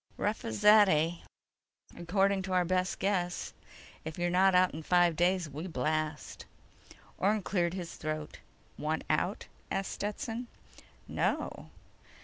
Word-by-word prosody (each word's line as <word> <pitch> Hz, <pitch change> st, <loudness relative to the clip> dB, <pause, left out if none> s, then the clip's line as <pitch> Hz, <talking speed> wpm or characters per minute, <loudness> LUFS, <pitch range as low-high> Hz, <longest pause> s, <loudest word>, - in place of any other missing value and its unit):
"Rough -, -, -1 dB
as 110 Hz, -1 st, -4 dB
that, 210 Hz, -1 st, +8 dB
eh?" 165 Hz, +1 st, +2 dB, 0.8 s
"According 195 Hz, +3 st, +1 dB
to 190 Hz, 0 st, -4 dB
our 180 Hz, -1 st, +3 dB
best 185 Hz, +1 st, 0 dB
guess. 180 Hz, -3 st, -1 dB, 0.5 s
If 160 Hz, 0 st, -6 dB
you're 175 Hz, 0 st, 0 dB
not 190 Hz, +1 st, +4 dB
out 180 Hz, 0 st, +4 dB
in 160 Hz, -, -5 dB
five 175 Hz, 0 st, +3 dB
days, 180 Hz, +1 st, +2 dB
we 150 Hz, +5 st, -6 dB
blast." 155 Hz, 0 st, -3 dB, 0.7 s
Orne 205 Hz, +1 st, +2 dB
cleared 175 Hz, -2 st, 0 dB
his 175 Hz, -3 st, -5 dB
throat. 155 Hz, -1 st, -5 dB, 0.4 s
"Want 155 Hz, +1 st, -1 dB
out?" 180 Hz, +6 st, 0 dB, 0.2 s
asked 195 Hz, 0 st, -2 dB
Stetson. 225 Hz, +3 st, -4 dB, 0.6 s
"No." -, -, -2 dB
180 Hz, 130 wpm, -31 LUFS, 160-195 Hz, 0.8 s, that